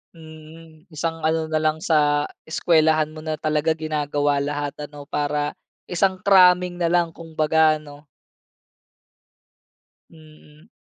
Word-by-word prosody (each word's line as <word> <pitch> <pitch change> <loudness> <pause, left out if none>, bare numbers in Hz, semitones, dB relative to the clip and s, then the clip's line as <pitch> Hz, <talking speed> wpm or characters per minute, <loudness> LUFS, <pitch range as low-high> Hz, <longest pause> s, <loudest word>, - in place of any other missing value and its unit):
Mm. 160 +1 -15
Isang 165 +1 -4
ano 160 0 0
na 155 0 -1
lang 155 0 +1
sa 150 -3 +1 0.2
eskwelahan 155 -1 +1
mo 155 - -9
na 155 -1 -4
talaga 155 +1 0
ginagawa 145 -2 -1
lahat 145 0 -3 0.2
ano 145 -1 -11
para 145 0 -2 0.3
isang 185 +1 0
cramming 180 -2 +4
na 170 - +2
lang 170 -1 +1
kumbaga 160 -1 +1
ano? 145 -1 -15 2.0
Mm. 155 +2 -19
155 Hz, 115 wpm, -22 LUFS, 150-165 Hz, 2.0 s, cramming